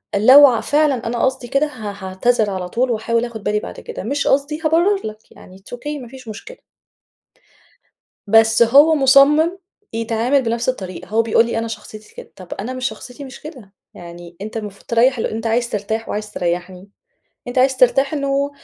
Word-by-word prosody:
لو 260 +8 +8
ع 235 -4 +1
فعلًا 290 -5 +1
أنا 235 0 -2
قصدي 260 -1 -2
كده 275 +5 +1
ه 225 -8 -7
هاعتذر 210 +3 +1
على 185 -2 -4
طول، 245 +5 0
وأحاول 230 +1 -1
آخد 225 -4 -9
بالي 210 0 0
بعد - - -9
كده، 470 - -8
مش 285 0 -2
قصدي، 285 +3 +1
هابرّر 350 +6 +2
لك 215 0 -9
يعني 185 - -15
it's 200 +5 -10
Okay 295 +2 -6
مافيش 255 0 -12
مشكلة. - - -9 1.7
بس 225 +1 +4
هو 285 +7 +5
مصمِّم 295 +5 +4 0.4
يتعامل 230 +4 0
بنفس 235 +2 -1
الطريقة، 185 -8 -6
هو 220 +4 +1
بيقول 230 0 +2
لي 230 - -3
أنا 225 0 -2
شخصيتي 215 -1 -10
كده، - - -11
طَب 185 -2 -9
أنا 230 +6 -6
مش 255 +1 -2
شخصيتي 250 +3 -11
مش 265 -1 -11
كده، 250 -10 -12 0.2
يعني 175 0 -12
أنت 215 +2 -6
المفروض 210 -3 -8
تريّح 245 +3 +2
الل 225 - -2
أنت 225 +1 -4
عايز 235 +1 0
ترتاح 220 +2 -4
وعايز 210 0 -4
تريّحني، 180 +2 -4 0.6
أنت 245 - -2
عايز 265 +1 +3
ترتاح 270 +3 +3
إنه 280 0 -1
235 Hz, 180 wpm, -19 LUFS, 215-275 Hz, 1.7 s, لو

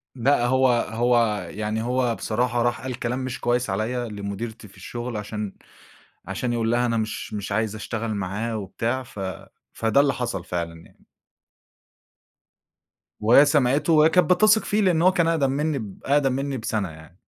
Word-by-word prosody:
لأ، 125 0 +2
هو 130 +1 +3
هو 115 -4 +1
يعني 110 +2 -3
هو 125 -1 0
بصراحة 120 +4 -1
راح 120 0 0
قال 130 -1 -5
كلام 120 +2 -2
مش 130 -1 -4
كويس 120 -1 0
عليَّ 115 +5 -2
لمديرتي 105 +2 -6
في 95 - -19
الشغل 120 -1 -5
عشان 105 -1 -5 0.7
عشان 125 -1 -2
يقول 115 -1 0
لها: 120 +1 +2
"أنا 115 -1 0
مش 110 -1 -3
مش 100 -1 -4
عايز 110 +1 0
أشتغل 110 +1 -4
معاه 105 +4 -3
وبتاع." 115 +6 -2
ف 120 - -14 0.5
فده 115 +5 +2
اللي 140 -1 +3
حصل 100 -8 -3
فعلًا 85 -2 -4
يعني. - - -25 2.1
وهي 120 +7 +6
سمعته 145 +2 +2
وهي 155 +1 +6
كانت 180 +2 +3
بتثق 215 +3 +4
فيه 210 0 +1
لأن 175 -4 +3
هو 185 - +6
كان 170 -3 +1
أقدم 150 -5 +2
منّي 150 +1 0
ب 105 -4 -8
أقدم 140 -1 +3
منّي 135 +1 -2
بسنة 110 -4 -2
يعني. 80 +3 -15
120 Hz, 165 wpm, -24 LUFS, 105-130 Hz, 2.1 s, وهي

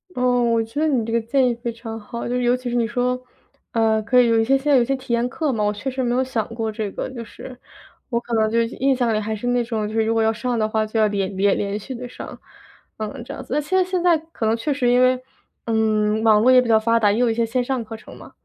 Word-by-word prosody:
哦， 250 -1 +2
我 230 -1 +2
觉 225 +6 -6
得 315 - +2
你 255 -7 +1
这 225 - -4
个 235 - +2
建 255 +3 +2
议 240 - 0
非 235 0 -4
常 225 -1 -8
好。 235 +3 -6
就 245 - -2
尤 245 0 +2
其 250 -1 -5
是 240 - -2
你 235 -1 +2
说， 250 +2 -1 0.5
呃， 220 -1 +2
可 250 +3 +4
以 245 - +3
有 230 -1 +3
一 - - +3
些 270 +3 +3
现 290 +2 -1
在 275 - +6
有 245 - +4
些 270 +3 0
体 255 -2 -5
验 235 +1 +1
课 305 +2 -1
嘛， 220 -4 -1
我 210 0 +1
确 210 +6 -4
实 260 0 -3
没 240 -1 0
有 255 +1 +2
想 240 -5 -2
过 225 -1 -2
这 215 -2 -4
个 - - -5
就 245 -3 -7
是。 250 +3 -11 0.5
我 235 -2 0
可 240 - -13
能 220 -1 +3
就 230 - +2
是 230 - +2
印 270 0 +2
象 245 -3 +1
里 215 - +1
还 215 +1 -3
是 215 +3 -5
那 245 0 +2
种， 225 -3 -2
就 215 - -6
是 225 -1 +2
如 225 - +1
果 225 - +2
要 220 0 +3
上 245 +2 -2
的 215 0 0
话 220 0 0
就 220 +1 -2
要 215 - +4
连 200 -1 -2
连 195 +1 +2
连 200 0 -2
续 260 +5 -7
地 245 +1 -7
上， 245 - -9 0.6
嗯， 220 +4 -5
这 - - -7
样 265 - -7
子。 260 - -7
但 300 - +1
现 330 +6 -2
在 375 - +4
现 365 -1 -2
在 350 -2 +5 0.2
可 225 - -3
能 220 +1 +2
确 235 +6 -2
实 265 -3 0
因 245 +1 +4
为， 255 0 +3 0.5
嗯， 220 -1 +1
网 215 -2 +5
络 245 +4 +5
也 255 -1 +7
比 245 - -3
较 220 -1 +5
发 230 +1 +2
达， 205 -2 +3
也 210 - 0
有 245 +1 +3
一 225 - +1
些 230 +1 0
线 240 +2 0
上 255 -1 -2
课 225 0 -8
程 - - -13
嘛。 - - -13
235 Hz, 335 characters per minute, -21 LUFS, 220-250 Hz, 0.6 s, 也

